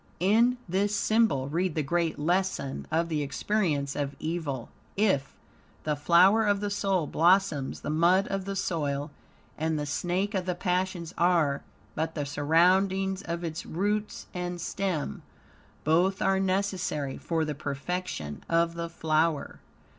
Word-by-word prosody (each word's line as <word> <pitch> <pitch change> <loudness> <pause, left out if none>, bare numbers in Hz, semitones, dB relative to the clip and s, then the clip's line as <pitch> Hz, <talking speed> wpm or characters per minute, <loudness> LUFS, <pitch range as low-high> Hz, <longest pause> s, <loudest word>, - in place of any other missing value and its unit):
In 230 +7 +4
this 200 +4 +1
symbol 215 -13 +2
read 170 +3 -1
the 155 - 0
great 170 +2 0
lesson 175 -3 -1
of 165 +2 +1
the 155 -3 -1
experience 145 -1 -1
of 140 -1 -2
evil. 155 -6 -3 0.3
If, 190 -10 +1 0.5
the 150 -1 0
flower 180 +9 +5
of 205 -2 +2
the 205 0 -2
soul, 195 -4 +1
blossoms; 170 -3 +2
the - - -3
mud 175 +5 +3
of 195 -1 -2
the 195 0 -3
soil 145 -5 -2 0.5
and 160 0 0
the 150 - -2
snake 180 +8 -1
of 190 -2 -2
the 180 - 0
passions 180 -1 -1
are 165 -5 +3 0.3
but 160 +1 -2
the 145 -2 -2
surroundings 185 +6 +2
of 170 -1 -4
its 165 0 -4
roots 205 +5 -2
and 180 -1 -4
stem. 170 - -2 0.6
Both 180 +5 +2
are 195 0 +2
necessary 185 -7 -1
for 165 -2 -1
the 150 - -2
perfection 140 - -4
of 165 0 +2
the 170 0 -4
flower. 160 -2 0
170 Hz, 145 wpm, -28 LUFS, 150-190 Hz, 0.6 s, flower